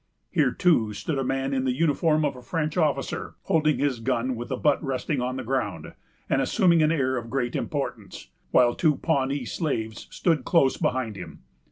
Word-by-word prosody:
Here, - - +3
too, 120 - +2
stood 140 +6 -3
a - - 0
man, 135 +1 -1
in 130 -1 0
the 130 -1 0
uniform 155 0 +2
of 140 - -1
a 125 - -10
French 155 +5 -2
officer, 150 -5 -1
holding 155 -2 +2
his 140 -4 0
gun 125 +1 -1
with 120 +1 -6
the 130 - -2
butt 145 +2 +2
resting 135 0 -2
on 125 +1 -2
the 130 - -4
ground, 100 -11 -3 0.3
and 135 - +2
assuming 170 - +3
an 155 0 +3
air 130 -5 +1
of 115 -1 -5
great 125 -1 -1
importance; 115 -9 -4 0.2
while 120 -1 +4
two 155 +1 +2
Pawnee 140 -4 0
slaves 110 - -3
stood 165 -4 0
close 135 -6 +3
behind 120 -5 -1
him. 85 -3 -10
135 Hz, 190 wpm, -25 LUFS, 125-150 Hz, 0.3 s, while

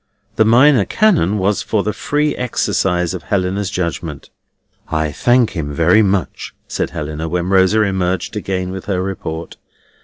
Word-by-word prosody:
The 110 - +3
Minor 125 +1 +5
Canon 105 - +2
was 100 +1 0
for 105 -2 -1
the 105 - -2
free 150 +1 -1
exercise 90 -7 0
of 90 - -5
Helena's 95 0 -1
judgment. 85 -5 -4 0.6
"I 80 -1 -1
thank 120 - +2
him 75 -4 -4
very 85 +8 +4
much," 100 -3 -2
said - - -2
Helena, 75 +2 -5
when 90 +1 -2
Rosa 95 +3 +4
emerged 95 0 -1
again 95 -3 -3
with 95 0 -7
her 95 -2 -1
report. 85 -4 -5
95 Hz, 150 wpm, -17 LUFS, 85-105 Hz, 0.6 s, Minor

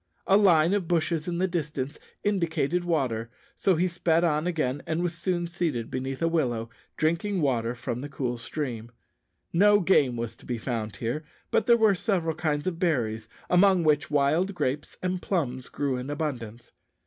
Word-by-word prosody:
A 195 - +4
line 180 -4 +5
of 200 -4 0
bushes 165 -1 0
in 170 -1 -2
the 185 +2 +2
distance 150 -5 -3 0.2
indicated 175 -4 0
water, 130 -10 -1 0.3
so 190 - +2
he 175 +3 +2
sped 170 -1 +1
on 155 0 +1
again, 145 -6 -1
and 165 +2 0
was 175 -1 -1
soon 175 0 -1
seated 170 -9 -2
beneath 130 +3 -3
a - - +4
willow, 120 -9 0 0.3
drinking 170 +5 0
water 120 -5 0
from 120 0 -4
the 145 - -6
cool 125 -4 -3
stream. 120 -4 -4 0.6
No 205 +4 +6
game 150 -9 +3
was 115 -1 -4
to - - -17
be 120 - -2
found 110 -2 -3
here, 120 +7 -3 0.3
but - - +2
there 235 -1 +7
were 220 -3 +5
several 180 -4 0
kinds 150 -3 -1
of 175 -3 -2
berries, 115 - 0 0.2
among 180 0 +4
which 150 -2 +2
wild 155 +7 +2
grapes 145 -2 -2
and 185 0 -1
plums 130 -9 -2
grew 140 -3 -1
in 125 +2 -5
abundance. 120 -7 -4
155 Hz, 175 wpm, -27 LUFS, 130-175 Hz, 0.6 s, there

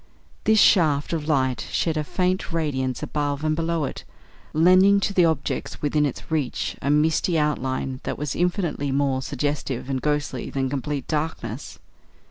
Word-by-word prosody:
This 220 0 +4
shaft 155 -8 +4
of 155 -2 -2
light 130 -6 +1
shed 165 -2 0
a 155 - 0
faint 185 +4 -1
radiance 130 -6 -1
above 145 -1 -2
and 155 0 +1
below 165 -1 0
it, - - -6 0.5
lending 185 +5 +5
to 200 0 -1
the 180 -3 +5
objects 160 -4 -2
within 150 0 +1
its 140 - -8
reach 150 -6 -1
a 140 - -1
misty 160 +3 +2
outline 130 -3 -1
that - - -4
was 145 -1 -3
infinitely 175 -6 0
more 135 -1 +1
suggestive 140 -2 -3
and 130 -1 -1
ghostly 145 -4 -1
than 135 -1 -2
complete 140 0 -3
darkness. 150 -6 -3
150 Hz, 155 wpm, -24 LUFS, 135-165 Hz, 0.5 s, lending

